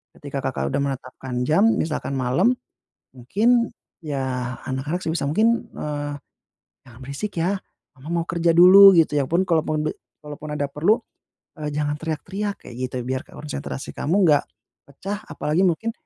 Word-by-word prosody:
Ketika 140 -1 -6
Kakak 130 0 -2
sudah 140 - +1
menetapkan 130 -1 -7
jam 160 +6 +4
misalkan 150 -3 -2
malam 130 - +2 0.6
mungkin 230 - +2 0.3
ya, 130 -4 -3
anak-anak 135 +6 -2
sebisa 160 -2 -1
mungkin 225 +8 +2
eee, 145 -1 -3 0.7
"Jangan 120 -2 -15
berisik 140 +10 -5
ya 180 +4 +1 0.4
Mama 135 +4 -12
mau - - -10
kerja 170 0 +1
dulu," 185 +4 +9
gitu. 160 -2 +3
Ya 140 - +2
pun 180 +3 +2
kalaupun 155 -2 +1
de - - 0 0.3
kalaupun 150 +1 -8
ada 145 - 0
perlu, 160 - +2 0.6
eee, 150 -1 -3
"Jangan 145 0 -1
teriak-teriak," 190 +6 -3
kayak 120 - -10
gitu 130 0 -4
biar 130 0 -2
konsentrasi 145 -2 -6
kamu 165 +6 0
enggak 150 -3 +4 0.4
pecah. 195 +9 -5
Apalagi 155 +4 -1
mungkin 190 +6 +1
150 Hz, 150 wpm, -23 LUFS, 135-180 Hz, 0.7 s, dulu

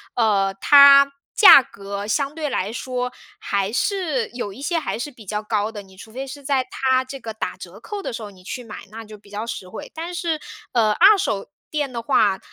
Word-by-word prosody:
呃， 200 -4 +2
它 280 -1 +8 0.2
价 390 -10 +9
格 200 -4 -7
相 275 +6 -1
对 310 -2 -3
来 200 -4 -2
说， 250 +1 -4 0.3
还 200 +2 -2
是 315 - -1
有 230 -4 -6
一 265 - -12
些 335 +3 0
还 310 - -4
是 290 +5 -5
比 230 -4 -15
较 210 +2 -3
高 210 -1 -1
的。 215 -2 -8
你 190 -1 -18
除 220 +2 -13
非 265 +2 -5
是 280 +2 -9
在 265 -1 +1
它 260 -1 +1
这 270 +1 -9
个 225 -3 -7
打 220 - -5
折 - - -11
扣 415 -2 -6
的 375 - -5
时 225 -1 -6
候 205 - -8
你 185 -2 -18
去 245 +7 -7
买， 220 -3 -10
那 225 +2 -9
就 215 -1 -12
比 205 0 -21
较 205 +2 -5
实 210 -5 -6
惠。 180 - -9
但 335 +2 -6
是， 335 -3 -2 0.3
呃， 220 -3 +2
二 410 - +6
手 215 - -2 0.2
店 290 -4 -2
的 235 - -4
话， 205 -4 +2
240 Hz, 240 characters per minute, -21 LUFS, 210-280 Hz, 0.3 s, 价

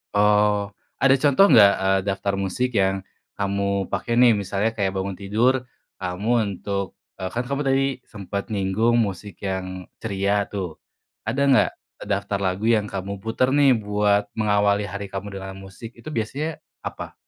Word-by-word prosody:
Oh. 105 0 +3 0.3
Ada 135 0 +5
contoh 145 +6 +6
nggak, 100 -3 +8
eee, 95 0 +3
daftar 100 0 -1
musik 125 +6 -1
yang 95 -2 +1 0.3
kamu 100 -1 0
pakai 120 0 -1
nih, 120 -2 +7
misalnya 100 +2 -1
kayak 100 -3 -1
bangun 95 0 -2
tidur, 110 +6 +2 0.5
kamu 90 +5 -3 0.3
untuk, 100 -2 -4 0.2
eee, 95 - -2
kan 120 +1 -2
kamu 140 +2 -2
tadi 135 0 +3 0.2
sempat 100 0 -5
nyinggung 105 +4 +1
musik 100 -3 -2
yang 95 -1 -4 0.2
ceria 100 -1 0
tuh. 95 -6 -5 0.5
Ada 130 +5 0
nggak 130 - +5 0.4
daftar 100 -1 -1
lagu 95 +3 -1
yang 110 -3 +3
kamu 100 0 -5
putar 115 +3 +1
nih 140 -4 +5
buat 105 -1 +1
mengawali 105 -1 +2
hari 100 0 -5
kamu 100 +1 -5
dengan 95 0 -7
musik, 110 +5 -10
itu 120 +6 -10
biasanya 145 +6 -3 0.2
apa? - - -6
100 Hz, 155 wpm, -23 LUFS, 95-115 Hz, 0.5 s, nggak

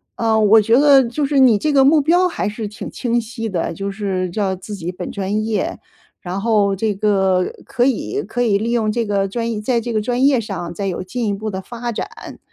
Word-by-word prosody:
呃， 225 -1 +1
我 215 +1 +6
觉 225 +4 +3
得 280 -2 +6
就 250 +5 -2
是 280 0 +1
你 250 -5 +6
这 300 +7 -1
个 270 -1 +5
目 300 +3 +5
标 350 +5 +3
还 340 - -3
是 210 +1 -4
挺 210 - -8
清 240 -1 -1
晰 225 0 -5
的， 170 -3 -2
就 195 +4 -4
是 195 -3 -2
叫 190 +1 -1
自 190 +3 -9
己 175 -3 -5
本 180 - -7
专 205 +2 -2
业， 215 -3 -2 0.4
然 180 +2 -4
后 205 -2 +2
这 210 +1 -1
个 190 -3 +1
可 245 - 0
以 275 - -1
可 245 - -3
以 220 -5 +3
利 225 +3 -2
用 230 -3 +1
这 230 +1 -1
个 200 -2 0
专 230 +3 -3
业 215 - -3
在 235 +2 0
这 240 - -4
个 215 -2 0
专 245 +4 0
业 275 -3 +4
上 190 -6 -5
再 195 +2 -3
有 185 - -3
进 230 +5 -3
一 205 - 0
步 215 +2 -4
地 190 -2 -4
发 240 +4 -5
展。 225 - -7
215 Hz, 255 characters per minute, -19 LUFS, 195-240 Hz, 0.4 s, 我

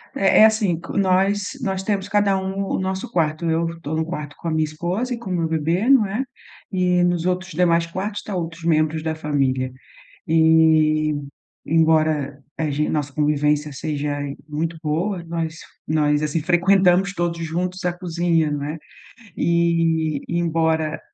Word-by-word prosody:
É 195 - +4
é - - +10
assim, 210 -7 +2
q 170 - -6
nós 195 +1 +2
nós 190 -4 -2
temos 200 -1 -1
cada 205 -1 +2
um 190 +1 -3
o - - -2
nosso 190 0 -3
quarto. 160 -1 0
Eu 165 +1 -1
tô 155 +1 -3
no 160 - 0
quarto 150 -3 -6
com 170 - -6
a 165 - 0
minha 155 0 +1
esposa 175 +11 -2
e - - -3
com 215 -5 -8
o - - -1
meu 165 -2 0
bebê, 165 - 0
né, 225 -2 +3 0.5
e 180 -1 +2
nos 175 -1 +1
outros 185 0 -1
demais 170 0 +2
quartos 195 +5 -4
está 200 - -6
outros 165 -1 -5
membros 155 -1 +1
da 160 0 -2
família. 135 -4 -1 0.6
E 160 -1 +4 0.5
embora, 155 -3 +2 0.2
a 155 -2 -1
gen 150 +1 -1
nossa 145 -2 -2
convivência 150 0 +1
seja 145 0 -3 0.3
muito 160 +2 -3
boa, 170 +4 -1
nós 165 -1 -3 0.3
nós 150 -1 +2
assim 150 +1 -1
frequentamos 185 +2 +3
todos 170 -1 -2
juntos 180 +3 -3
a 175 - +1
cozinha, 170 -3 0
né. 145 +2 -3 0.6
E 165 -3 +1
embora 160 -2 0
165 Hz, 160 wpm, -22 LUFS, 155-185 Hz, 0.6 s, é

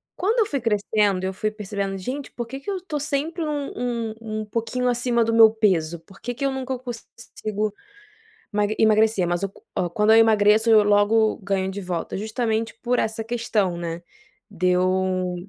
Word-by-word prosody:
Quando 440 +6 +1
eu 440 - +4
fui 280 -3 -2
crescendo, 210 -3 +1
eu 190 - -2
fui 215 +3 -1
percebendo: 200 -2 -4
"Gente 260 +8 -5
por 240 - -5
que 270 +3 -7
que 275 - -8
eu 390 - -2
estou 345 -5 -4
sempre 305 +3 -2
um 290 -2 -3
um 235 -2 -2
um 215 -1 -4
um - - -6
pouquinho 230 +3 -2
acima 240 -1 +1
do 230 - 0
meu 225 -1 +8
peso?". 175 -7 +1
Por 195 +4 -19
que 245 - -3
que 275 - -3
eu 275 - +1
nunca 265 -1 -3
consigo 220 -3 -5 0.8
ema 210 0 +2
emagrecer, 215 -3 +3
mas 175 +2 -1
qu 185 -2 -4
quando 210 +1 +4
eu - - +7
emagreço, 220 0 +5
eu 215 -1 +7
logo 210 +2 +3
ganho 195 -1 -1
de 195 +1 -6
volta, 180 -3 -4
justamente 220 +1 -2
por 250 0 +1
essa 220 0 -2
questão, 220 -6 -1
né. 170 0 -4 0.5
Deu 185 0 +1
220 Hz, 180 wpm, -23 LUFS, 195-245 Hz, 0.8 s, meu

